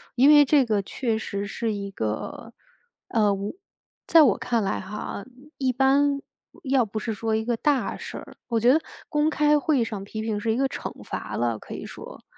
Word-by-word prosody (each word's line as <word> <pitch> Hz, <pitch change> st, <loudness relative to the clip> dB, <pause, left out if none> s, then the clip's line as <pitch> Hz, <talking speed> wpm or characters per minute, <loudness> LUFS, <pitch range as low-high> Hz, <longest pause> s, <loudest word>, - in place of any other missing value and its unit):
因 265 Hz, +4 st, +6 dB
为 295 Hz, -1 st, +9 dB
这 280 Hz, -2 st, +4 dB
个 210 Hz, -3 st, +1 dB
确 225 Hz, +2 st, -2 dB
实 200 Hz, -2 st, -4 dB
是 220 Hz, +2 st, -2 dB
一 200 Hz, -1 st, -5 dB
个， 110 Hz, -, -4 dB, 0.6 s
呃， 210 Hz, -4 st, +3 dB
我 200 Hz, +4 st, -4 dB, 0.5 s
在 325 Hz, -2 st, +7 dB
我 235 Hz, -8 st, +4 dB
看 235 Hz, -3 st, 0 dB
来 -, -, -1 dB
哈， 200 Hz, +1 st, -6 dB, 0.4 s
一 260 Hz, -1 st, +2 dB
般 280 Hz, +2 st, +3 dB, 0.4 s
要 265 Hz, -2 st, +3 dB
不 215 Hz, +1 st, -7 dB
是 220 Hz, +1 st, -2 dB
说 220 Hz, +1 st, -1 dB
一 220 Hz, 0 st, -1 dB
个 240 Hz, -1 st, +1 dB
大 285 Hz, +2 st, +1 dB
事 -, -, -7 dB
儿 -, -, -11 dB
我 230 Hz, -2 st, +1 dB
觉 245 Hz, +4 st, +5 dB
得 315 Hz, -, +3 dB, 0.3 s
公 300 Hz, 0 st, +2 dB
开 300 Hz, -1 st, +3 dB
会 295 Hz, -3 st, +1 dB
议 -, -, +3 dB
上 210 Hz, -3 st, -5 dB
批 215 Hz, +2 st, -6 dB
评 215 Hz, -2 st, -1 dB
是 225 Hz, +1 st, 0 dB
一 225 Hz, -, 0 dB
个 270 Hz, 0 st, +2 dB
惩 -, -, -5 dB
罚 -, -, -5 dB
了， 115 Hz, -2 st, 0 dB
可 -, -, -9 dB
以 -, -, -7 dB
说， -, -, -10 dB
230 Hz, 225 characters per minute, -25 LUFS, 210-275 Hz, 0.6 s, 为